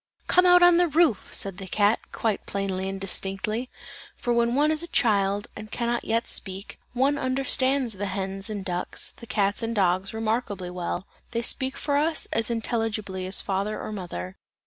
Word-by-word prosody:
"Come 360 0 +5
out 355 0 +7
on 350 -1 +7
the 350 0 +4
roof!" 305 - +2
said 195 -1 +1
the 190 - -7
cat, 205 +3 +3
quite 220 -3 -2
plain 195 -1 -2
and 190 +1 -3
distinctly, 195 +5 0 0.5
for 240 - -1
when 235 +1 +2
one 300 +2 +3
is 310 0 0
a 340 - -2
child, 205 - +2
and 215 0 -8
can 235 - -3
not 240 0 0
yet 230 +1 0
speak, 195 0 -1
one 275 +3 +2
understands 260 -1 +1
the 200 +1 -3
hens 195 +1 -2
and 205 -3 -4
ducks, 180 -1 -3
the 235 - -13
cats 200 0 +1
and 230 0 -2
dogs 185 -1 +1
remarkably 220 -4 -2
well; 180 +1 -3 0.3
they 235 0 -1
speak 260 +2 -1
for 285 -1 0
us 315 +2 +2
as 225 0 +1
intelligibly 220 -5 -2
as 190 - +1
father 200 +2 -2
or - - -5
mother. 95 - -6
215 Hz, 185 wpm, -26 LUFS, 195-250 Hz, 0.5 s, out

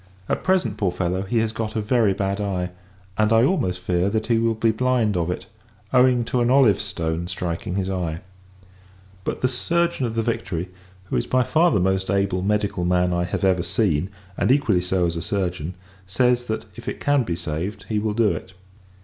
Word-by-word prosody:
At - - -1
present, 175 - +1
poor 95 -4 +1
fellow, 90 +1 -1
he 100 +5 -2
has 110 -1 0
got 110 0 -4
a - - +1
very 110 -1 +2
bad 100 +1 -1
eye 90 -3 -2 0.5
and, 110 0 +3
I 115 0 +5
almost 125 - +1
fear, 90 +1 +1
that 110 +1 -1
he 115 -1 +2
will 115 0 +1
be 110 +1 +2
blind 120 -3 +1
of 85 -1 0
it 90 - -3 0.5
owing 125 -1 +5
to 125 +1 0
an 120 - +2
olive 125 -7 +5
stone 85 -4 -3
striking 90 0 -3
his 95 -1 -1
eye: 85 -4 -2 1.0
but - - -3
the 125 - +3
surgeon 165 +2 0
of 115 - -5
the 115 - +1
Victory, 95 -6 -2 0.3
who 95 - -2
is - - -1
by 130 0 +3
far 165 +7 +3
the 105 - +2
most 95 +1 0
able 100 -1 +1
medical 100 -2 0
man 90 0 +2
I 90 0 0
have 90 - -3
ever 95 -2 +3
seen, 95 -4 0 0.3
and - - +3
equally 115 -10 +3
so 90 0 0
as 85 0 -1
a - - -3
surgeon, 90 -2 -2 0.3
[says] 125 +5 +2
that, 110 -2 -3
if - - -11
it - - -6
can 145 -1 +2
be 90 -8 -2
saved, 85 +4 -4
he 105 -2 0
will 105 0 -1
do 115 -2 +3
it. 85 +3 -6
100 Hz, 210 wpm, -23 LUFS, 90-115 Hz, 1.0 s, I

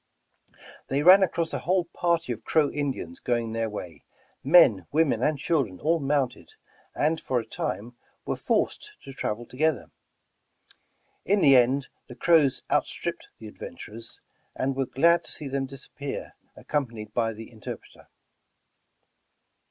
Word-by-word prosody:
They 140 +2 0
ran 185 +4 +9
across 170 -3 0
a - - -1
whole 180 0 +1
party 170 -4 -1
of 110 - -11
Crow 155 -3 +2
In 145 -1 -1
dians 85 -8 -8
going 120 -2 0
their 115 0 -1
way, 90 -7 -8 0.4
men, 130 - +6
women 155 -1 +2
and 150 -1 +1
children 135 - -1
all 165 +2 +1
mounted, 140 -3 -1 0.2
» - - -31
and 160 +2 +1
for 125 - 0
a 115 - -6
time 115 +2 -4 0.3
were - - -1
forced 420 - -1
to 135 - -9
travel 120 -2 -3
to 125 - -15
gether. 155 +2 0 1.3
In 205 +2 +2
the 140 -2 +7
end 130 +2 +3 0.2
the 125 - -10
Crows 150 -1 +3
outstripped - - -1
the 110 - -12
adven 85 - -9
turers, 115 +5 -9 0.4
and 135 +1 -1
they - - -12
were 135 - 0
glad 170 +7 +3
to - - -5
see 150 - -4
them 135 0 -2
disappear, 140 +1 -7 0.2
ac - - -14
companied 115 -7 -3
b3' 115 -1 0
the 115 +2 -10
interpreter. 110 -2 -10
135 Hz, 160 wpm, -26 LUFS, 115-160 Hz, 1.3 s, ran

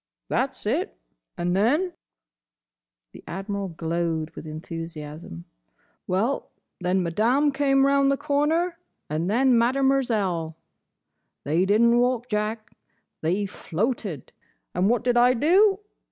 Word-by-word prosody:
"That's - - -1
it. - - -1 0.4
And 175 +1 0
then—" 295 - +2 1.2
the - - -13
Admiral 200 +2 -4
glowed 165 -1 -2
with - - -10
enthusiasm—"well, 155 - -6 0.3
then 180 0 +1
Madame 235 - +2
came 275 -1 +3
round 275 0 +3
the 275 - +1
corner; 310 +4 0 0.3
and 160 +4 -1
then 255 +4 +3
Mademerzell. 235 -10 +1 0.9
They 165 +6 +1
did 210 +3 +3
n't 235 0 +5
walk, 245 0 0
Jack, 210 0 -2 0.5
they 185 +6 0
floated. 195 - -3 0.4
And 185 +3 +2
what 240 +1 +1
did 245 -1 +2
I 250 +1 +5
do? 385 - +4
210 Hz, 110 wpm, -25 LUFS, 170-270 Hz, 1.2 s, n't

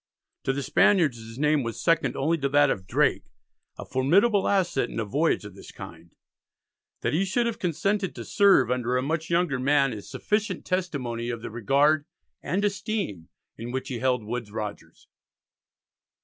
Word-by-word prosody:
To - - +2
the 140 +1 -3
Spaniards 165 - +3
his 115 +1 -11
name 150 +1 +2
was 115 -2 -5
second 165 -1 +1
only 155 +5 +1
to 140 -1 0
that 145 0 +4
of 95 -1 -4
Drake, - - +1 0.5
a - - -7
formidable 190 - +3
asset 175 -11 +1
in - - -5
a 110 - -1
voyage 145 +1 0
of 100 - -9
this 100 - -12
kind. 85 +1 -11 0.9
That - - -1
he 170 +5 +2
should 195 +5 0
have 235 -1 -2
consented 190 +3 -1
to - - -7
serve 200 - +4
under 125 0 0
a 125 - 0
much 160 +3 -2
younger 170 -6 +1
man 135 -1 +2
is 105 -2 -9
sufficient 210 -3 -2
testimony 135 -11 -2
of 115 -2 -5
the - - -6
regard 140 +7 +2 0.4
and 200 +3 -1
esteem 195 - -3 0.3
in 115 +2 -6
which 130 +2 -4
he 125 -3 -4
held 125 -2 +1
Woodes 115 0 -5
Rogers. 105 -1 -7
140 Hz, 175 wpm, -26 LUFS, 120-180 Hz, 0.9 s, that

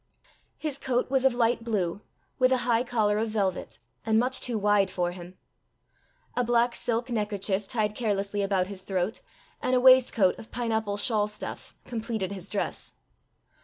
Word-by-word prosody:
His 295 -3 -3
coat 250 0 -1
was 265 -1 +2
of 260 -2 +4
light 235 -1 +1
blue, 200 -4 -1 0.4
with 255 0 +4
a 260 - +4
high 235 -1 +3
collar 215 -4 +1
of 225 0 -1
velvet, 190 - -2 0.3
and 220 0 +2
much 255 +2 +1
too 240 -3 -1
wide 205 -2 +3
for 175 -1 -1
him. 175 0 -10 1.0
A 250 - +2
black 240 0 +2
silk 240 +1 -2
neckerchief 205 -3 -1
tied 215 -3 0
carelessly 205 -3 -1
about 195 -2 +1
his 190 0 -7
throat, 190 +2 -2 0.4
and 255 - +1
a - - +4
waistcoat 250 -7 +5
of 225 - -11
pineapple 220 -4 -1
shawl 210 -1 +2
stuff, 210 0 -7
completed 220 -4 -3
his 195 -1 -6
dress. 205 - -3
220 Hz, 165 wpm, -27 LUFS, 200-240 Hz, 1.0 s, waistcoat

